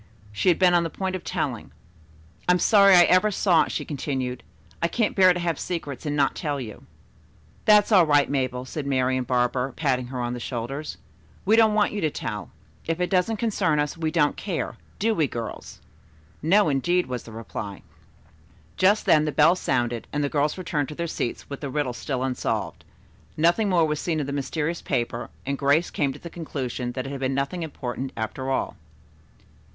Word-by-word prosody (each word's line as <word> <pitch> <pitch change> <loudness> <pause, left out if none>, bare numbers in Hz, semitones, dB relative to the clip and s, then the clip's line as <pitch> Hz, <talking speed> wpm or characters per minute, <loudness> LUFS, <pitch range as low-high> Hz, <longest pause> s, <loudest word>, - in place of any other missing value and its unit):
She 105 - +1
had 175 - +4
been 180 -2 +4
on 175 - +5
the 165 - -2
point 190 +3 -3
of 180 - -6
telling. - - -3 0.8
"I - - +7
am - - +3
sorry 200 0 +6
I 175 - +8
ever 185 +5 +4
saw 175 -6 +3
it," - - -7
she - - -3
continued. 130 -4 -3 0.4
"I 170 - +3
can't 225 +4 0
bear 185 -2 +7
to 180 - -1
have 170 -3 -1
secrets 150 -5 -4
and 145 - -1
not 140 -2 +2
tell 145 -4 -3
you." 110 -5 -9 0.8
"That's 210 0 +5
all 185 -6 +6
right, 145 -1 +4
Mabel," 130 -2 -2
said 140 +1 -5
Marian 130 -1 +1
Barber, 125 +1 0
patting 130 -5 0
her 125 0 -5
on 120 0 -2
the 125 - -5
shoulder. 120 +4 -4 0.6
"We 215 +3 +5
don't 220 -2 +5
want 210 -1 +3
you 210 - -3
to 155 - +2
tell. 105 -7 -5 0.4
If 165 +1 -1
it 180 -1 -1
doesn't 190 +4 +2
concern 195 -9 +1
us 145 +2 -1
we 160 -1 -1
don't 155 -3 +2
care, 185 -6 -3 0.2
do 225 +2 +1
we, 160 -8 +1
girls?" 115 -3 -7 0.6
"No, 195 +6 +4
indeed," 175 +6 +1
was 125 -1 -4
the 115 - -12
reply. 110 -3 -7 0.9
Just 200 +3 +3
then 155 -1 +5
the 150 - -1
bell 155 +5 +5
sounded 120 -8 -1
and 145 0 -1
the 145 - 0
girls 150 +2 0
returned 155 -6 -2
to 150 - -7
their 170 - -2
seats 155 -7 -4
with 140 - -7
the 140 - -4
riddle 135 -2 -1
still 130 +1 -3
unsolved. 110 -8 -2 0.5
Nothing 175 +7 +3
more 170 -3 +4
was 150 -1 -1
seen 160 -3 -1
of 145 - -1
the 140 - -4
mysterious 155 +4 -2
paper, 120 -3 -2 0.2
and 140 +1 -2
Grace 145 +5 +2
came 140 -3 0
to 135 - -9
the 170 +2 -10
conclusion 130 -6 -4
that 130 0 -4
it 135 - -5
had 140 - -5
been 130 0 -1
nothing 140 +6 -2
important, 130 -4 -5
after 125 +4 -3
all. 135 - -1
150 Hz, 200 wpm, -25 LUFS, 130-175 Hz, 0.9 s, I